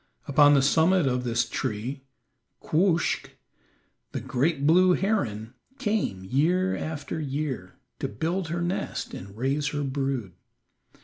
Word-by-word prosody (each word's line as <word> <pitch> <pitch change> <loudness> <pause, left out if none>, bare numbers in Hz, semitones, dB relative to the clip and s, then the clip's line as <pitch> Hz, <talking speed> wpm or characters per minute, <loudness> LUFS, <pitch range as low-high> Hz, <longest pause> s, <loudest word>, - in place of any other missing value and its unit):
Upon 145 +1 +6
the 135 - +4
summit 165 +4 +4
of 125 -1 0
this 115 0 +1
tree 115 +5 -3 0.6
Quoskh, 170 +1 +1 0.8
the - - -2
great 140 +2 0
blue 180 +4 +6
heron, 120 - -1 0.2
came 205 - -1
year 170 - +1
after 155 0 -4
year 140 -10 -3 0.2
to - - -1
build 165 - -2
her 170 +2 -2
nest 175 +2 -3
and 100 +2 -9
raise 140 +4 0
her 145 0 -2
brood. 135 -7 -2
145 Hz, 125 wpm, -26 LUFS, 125-170 Hz, 0.8 s, Upon